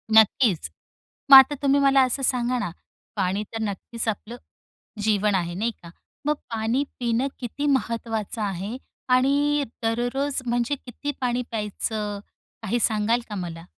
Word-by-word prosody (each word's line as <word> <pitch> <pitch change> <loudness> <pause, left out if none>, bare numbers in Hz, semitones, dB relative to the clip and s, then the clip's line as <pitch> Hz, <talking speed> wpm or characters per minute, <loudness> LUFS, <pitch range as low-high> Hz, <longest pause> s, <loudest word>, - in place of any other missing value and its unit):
नक्कीच. 220 - +4 0.6
मग - - +13
आता 265 +2 +7
तुम्ही 280 0 +3
मला 275 -1 +5
असं 260 +1 +1
सांगा 250 0 +1
ना, 210 - -2 0.5
पाणी 195 +1 0
तर 225 - -3
नक्कीच 220 +3 -4
आपलं 220 +2 -3 0.7
जीवन 210 -1 +2
आहे, 175 -2 -1
नाही 225 +5 -1
का? 170 - -10 0.4
मग 300 0 +2 0.2
पाणी 225 +4 0 0.2
पिणं 240 +2 +1
किती 260 +4 -4
महत्त्वाचं 230 -5 -1
आहे 200 +3 -3 0.4
आणि 285 +3 +3 0.2
दररोज, 245 +5 -1
म्हणजे 240 +3 0
किती 265 +2 -6
पाणी 250 -1 0
प्यायचं, 210 -1 -3 0.4
काही 225 +3 0
सांगाल 220 +2 +2
का 210 - -5
मला? 170 -3 -6
230 Hz, 140 wpm, -24 LUFS, 210-260 Hz, 0.7 s, मग